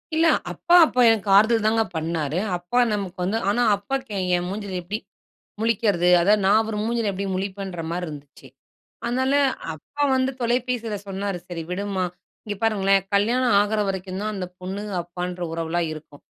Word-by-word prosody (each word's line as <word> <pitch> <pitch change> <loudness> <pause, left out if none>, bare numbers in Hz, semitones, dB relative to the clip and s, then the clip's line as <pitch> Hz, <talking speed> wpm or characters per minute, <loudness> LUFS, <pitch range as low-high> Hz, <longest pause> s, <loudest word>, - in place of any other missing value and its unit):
இல்ல 325 +1 +4 0.2
அப்பா 350 0 +2
அப்ப 250 -4 +2
எனக்கு 215 -3 +1
ஆறுதல் 220 +1 +4
தாங்க 225 0 +3
பண்ணாரு. 160 -1 -1 0.2
அப்பா 175 +8 -1
நமக்கு 195 -2 -4
வந்து 210 +5 0
ஆனா 240 +4 +1
அப்பாவுக்கு 225 +3 -4 0.2
என் 175 0 -3
மூஞ்சில 200 -2 -4
எப்படி 200 +5 -3 0.6
முழிக்கிறது? 205 -6 +2
அதாவது 205 +3 +3
நான் 215 +2 +4
ஒரு 210 - -3
மூஞ்சியில 230 -2 0
எப்படி 195 +1 -3
முழிப்பேன்ற 190 -2 -4
மாரி 175 +1 -3
இருந்துச்சு. 145 -2 -11 0.6
அதனால 260 +3 0 0.4
அப்பா 290 - -6
வந்து 260 0 +1
தொலைபேசில 240 -2 -1
சொன்னாரு 195 -1 -3
"சரி 170 -2 -5
விடும்மா" 195 0 -2 0.4
இங்க 205 -1 -4
பாருங்களேன் 195 -3 +3
கல்யாணம் 235 +3 +3
ஆகுற 210 +1 0
வரைக்கும் 190 0 -4
தான் 215 0 -2
அந்த 185 -2 -4
பொண்ணுங்க 200 +3 -5
அப்பான்ற 180 +1 -6
உறவுலாம் 165 +1 -1
இருக்கும். 150 -2 -11
200 Hz, 155 wpm, -23 LUFS, 180-225 Hz, 0.6 s, இல்ல